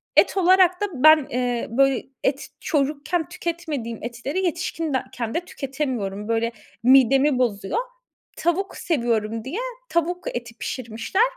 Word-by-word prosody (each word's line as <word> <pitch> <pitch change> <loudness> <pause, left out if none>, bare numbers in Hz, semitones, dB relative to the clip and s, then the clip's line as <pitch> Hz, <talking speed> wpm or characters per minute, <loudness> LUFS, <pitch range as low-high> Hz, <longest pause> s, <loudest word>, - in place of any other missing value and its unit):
et - - +5
olarak 370 0 +5
da - - +3 0.2
ben, 310 -3 +7
eee, 245 -1 -1
böyle 270 +2 +2 0.2
et 270 +1 -1
çocukken 305 +3 -1
tüketmediğim 320 -10 -4
etleri, 245 +10 -3
yetişkinken 295 -8 -2
de - - +1
tüketemiyorum. 255 - -3
Böyle, 230 +1 +1 0.3
midemi 270 +2 +5
bozuyor. 235 - 0 0.6
Tavuk 355 +4 -1
seviyorum 230 -7 -1
diye, 315 - -3 0.3
tavuk 350 0 0
eti 235 -1 -6
pişirmişler. 240 - -1
275 Hz, 115 wpm, -23 LUFS, 235-335 Hz, 0.6 s, ben